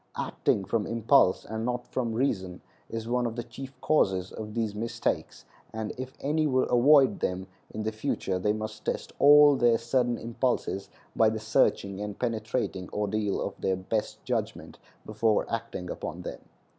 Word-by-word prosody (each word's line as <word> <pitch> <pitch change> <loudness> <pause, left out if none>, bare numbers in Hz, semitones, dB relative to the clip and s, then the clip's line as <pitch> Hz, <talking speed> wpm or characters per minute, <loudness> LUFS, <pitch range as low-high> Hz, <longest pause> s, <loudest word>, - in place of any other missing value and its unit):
Acting 95 - 0
from 110 -1 -1
impulse, 115 -3 +3
and 110 0 -4
not 125 0 -2
from 120 -3 -2
reason, 95 -8 -1 0.3
is 115 0 -5
one 120 0 +1
of 115 - -5
the 120 - -3
chief 130 +3 -10
causes 95 -11 +2
of 105 0 -7
these 110 -3 -1
mistakes; 115 +3 -3 0.3
and 110 -1 -4
if 130 +1 -7
any 155 +2 +1
would 130 -2 +1
avoid 135 +2 +5
them 90 +1 -2 0.2
in 110 - -5
the 110 - -1
future 110 -5 -2
they 105 +3 +1
must 110 0 -5
test - - -3
all 145 0 +8
their 120 -3 +4
sudden 120 +1 0
impulses 115 -4 -2 0.3
by 110 - +5
the 110 - -3
searching 100 -2 +1
and 105 -1 -5
penetrating 110 -5 -2
ordeal 105 0 -1
of - - -3
their 95 - +1
best 100 +4 -3
judgment - - -3 0.3
before 110 0 +1
acting 115 -6 -4
upon - - -6
them. - - -6
110 Hz, 165 wpm, -28 LUFS, 105-125 Hz, 0.3 s, all